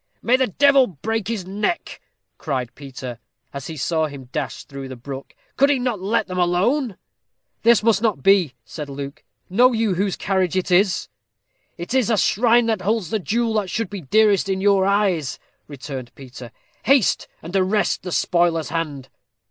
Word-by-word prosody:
"May 245 - +4
the 260 0 +2
devil 275 +4 +4
break 205 +5 -3
his 220 -5 -3
neck!" 210 - -3 0.4
cried 130 -6 -3
Peter, 130 -4 -8 0.3
as 140 -1 -6
he 160 - -7
saw 160 +3 0
him 135 -4 -10
dash 150 -3 -4
through 135 -1 -8
the 130 - -8
brook; 135 +2 -9 0.2
"could 280 +1 +5
he 285 - +3
not 245 -4 -2
let 215 +3 0
them 185 -1 -4
alone?" 195 +7 +1 0.6
"This 235 -1 +4
must 215 -3 +3
not 215 - 0
be," 185 -9 +4
said 150 0 -7
Luke; 140 0 -7 0.2
"know 245 +7 +4
you 220 -3 +1
whose 195 +1 0
carriage 190 -3 0
it 185 0 -1
is?" 185 +1 +3 0.7
"It 175 +7 -6
is 260 -4 +2
a 225 - +2
shrine 235 +4 +3
that 220 -4 0
holds 205 -2 -1
the 220 - 0
jewel 225 +4 0
that 190 - -8
should 220 +1 -3
be 200 -2 -5
dearest 205 +5 +3
in 190 0 0
your 195 -1 +3
eyes," 195 -8 +1 0.3
returned 135 -3 -8
Peter; 125 -3 -11 0.3
"haste, 265 -3 +3 0.2
and 170 +4 -7
arrest 195 +2 +1
the 180 - -6
spoiler's 170 -3 +1
hand." 150 -5 -3
190 Hz, 175 wpm, -21 LUFS, 150-220 Hz, 0.7 s, could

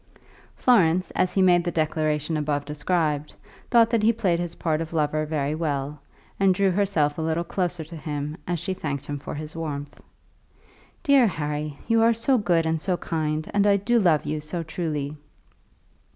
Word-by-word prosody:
Florence, 185 -7 +3
as 180 0 0
he 190 - +4
made 175 -1 +5
the 175 - -1
declaration 155 -1 0
above 145 -1 -1
described, 150 0 -1 0.3
thought 230 -1 +5
that 230 -2 +2
he 220 +2 +5
played 195 -7 0
his 175 -1 -4
part 160 -1 -1
of 165 0 -6
lover 155 -1 0
very 150 -2 -1
well, 150 -2 -2 0.4
and 195 -1 +4
drew 195 0 +2
herself 175 -6 +1
a - - -1
little 160 +1 0
closer 175 -1 -2
to 165 +2 -11
him 150 0 -4
as 175 0 0
she 180 +4 -2
thanked 145 -7 -4
him 145 -1 -4
for - - -6
his 155 +1 -7
warmth. 145 -3 -5 1.0
"Dear 280 -6 +5
Harry, 150 -4 -3
you 230 -1 +3
are 230 0 +4
so 250 +3 +2
good 175 -5 +2
and 160 -1 0
so 180 0 0
kind, 155 -2 -2
and 205 0 +3
I 200 -1 +5
do 235 +5 +2
love 170 -7 +3
you 150 +1 -2
so 165 +3 -4
truly!" 155 -3 -3
160 Hz, 180 wpm, -25 LUFS, 150-185 Hz, 1.0 s, made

